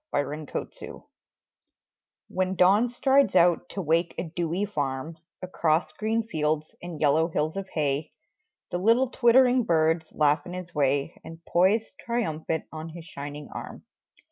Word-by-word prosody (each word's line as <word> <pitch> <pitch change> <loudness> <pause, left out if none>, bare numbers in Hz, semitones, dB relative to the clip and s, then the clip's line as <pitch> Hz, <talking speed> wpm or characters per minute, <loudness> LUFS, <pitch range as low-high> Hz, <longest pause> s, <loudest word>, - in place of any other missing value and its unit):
Alarm 150 +1 -2
Clocks - - -6 1.5
When 185 0 -1
Dawn 200 +7 +4
strides 265 -2 +3
out 175 -1 +4
to 195 - -4
wake 165 +2 +1
a - - -2
dewy 170 +3 -2
farm 145 -4 -4 0.2
Across 170 -3 0
green 220 +1 -1
fields 155 -6 -2
and 175 -3 -7
yellow 155 +2 +3
hills 155 -1 -1
of 195 -1 -5
hay 150 -1 -1 0.6
The 175 - -1
little 235 +6 +3
twittering 250 0 +4
birds 160 -2 +1
laugh 150 0 +3
in 175 - -7
his 180 -2 -7
way 140 +1 0
And 165 0 -11
poise 195 +6 +2
triumphant 160 -9 -2
on 160 +1 -7
his 165 0 -10
shining 145 -1 -8
arm. - - -8
170 Hz, 140 wpm, -26 LUFS, 155-195 Hz, 1.5 s, Dawn